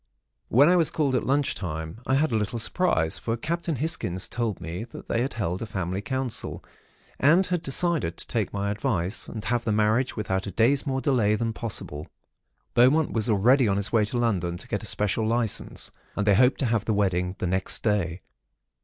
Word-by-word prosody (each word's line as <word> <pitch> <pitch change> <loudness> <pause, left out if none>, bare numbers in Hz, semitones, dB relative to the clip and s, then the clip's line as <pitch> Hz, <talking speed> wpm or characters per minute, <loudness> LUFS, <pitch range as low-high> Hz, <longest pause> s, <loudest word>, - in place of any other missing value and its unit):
"When 140 +5 +5
I 180 +1 +5
was 165 -3 +3
called 145 -4 0
at 130 - 0
lunch 140 +1 +2
time, 80 +3 -5
I 130 - +3
had 150 0 +2
a - - +1
little 110 +2 -1
surprise; 110 - 0
for 115 0 -2
Captain 170 +5 -2
Hisgins 115 - -2
told 115 -5 -2
me 85 +5 -5
that 120 - -11
they 115 - 0
had 130 - -2
held 95 -5 -2
a 115 - -4
family 95 -1 -3
council, 130 0 -3 0.5
and 165 +8 +5
had 180 -2 -1
decided 140 - 0
to - - +1
take - - -2
my 100 0 -2
advice, 105 -4 -1
and 110 -1 -7
have 120 +2 0
the 110 - 0
marriage 110 +4 +2
without 95 -2 -2
a - - -4
day's 135 +7 +2
more 135 -1 -1
delay 115 -6 +2
than 115 +1 -2
possible. 80 -10 -5 0.7
Beaumont 140 +6 +4
was 115 0 0
already 120 +5 +4
on 100 -1 +1
his 100 0 -2
way 110 -2 +3
to 115 +4 -2
London 90 -8 0
to - - -11
get - - -2
a - - -8
special 105 +2 0
licence, 115 -2 -1 0.2
and 105 - -1
they 105 - +5
hoped 125 +6 +4
to - - +2
have 115 -2 0
the 110 - 0
wedding 90 -2 0
the - - -3
next 95 +1 0
day. 95 -5 0
110 Hz, 205 wpm, -26 LUFS, 100-130 Hz, 0.7 s, When